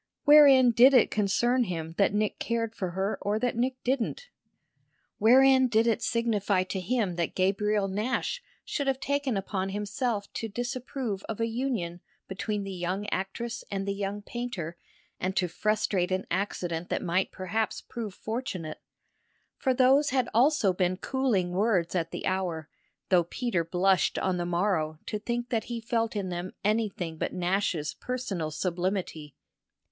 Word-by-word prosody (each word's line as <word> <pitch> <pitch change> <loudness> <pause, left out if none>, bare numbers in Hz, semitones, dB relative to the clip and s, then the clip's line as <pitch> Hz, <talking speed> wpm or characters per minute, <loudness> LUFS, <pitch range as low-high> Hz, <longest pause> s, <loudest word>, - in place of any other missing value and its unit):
Wherein 280 -4 +8
did 255 +4 +7
it 245 - +5
concern 240 +5 +2
him 165 -4 -4
that 200 - +4
Nick 210 +1 -1
cared 230 -1 -1
for 185 -5 -3
her 190 +4 -2
or 205 +1 0
that 245 +1 0
Nick 255 +2 0
didn't? 270 - -1 0.9
Wherein 260 +3 +6
did 225 -1 +3
it 230 -2 +1
signify 210 -5 +1
to 190 +1 -4
him 195 -2 -1
that 170 -2 -1
Gabriel 200 +2 +1
Nash 225 - -2 0.2
should 285 -2 -2
have 265 -1 +1
taken 280 -4 0
upon 195 0 -2
himself 205 +1 -2
to 225 - -3
disapprove 245 -2 -4
of 225 - -4
a 230 - +2
union 225 -8 -2 0.3
between 205 +1 -3
the 195 - -5
young 185 +3 -2
actress 230 +5 -3
and 195 -1 -3
the 200 - 0
young 200 +1 -4
painter 210 -9 -5 0.4
and 190 +1 -2
to 180 - +2
frustrate 190 0 0
an 185 +1 -1
accident 175 -2 -2
that - - -1
might 185 +1 0
perhaps 205 +4 -2
prove 220 -5 -7
fortunate? 220 - -4 0.8
For 265 - +2
those 265 +3 +4
had 255 -2 +1
also 240 -4 +4
been 180 0 0
cooling 225 -8 0
words 185 -3 +1
at 165 -3 -1
the - - -5
hour, 175 -5 -2 0.4
though 175 -3 +4
Peter 200 -2 -1
blushed 185 +3 +2
on 185 -1 0
the 175 0 -2
morrow 170 -3 0
to 210 - -3
think 240 +2 -3
that 225 -2 -1
he 235 -1 -4
felt 230 -1 -1
in 195 -3 -2
them 175 +1 -4
anything 205 -6 -1
but - - -2
Nash's 180 -4 0
personal 215 -11 -3
sublimity. 175 -2 -3
205 Hz, 160 wpm, -28 LUFS, 185-240 Hz, 0.9 s, Wherein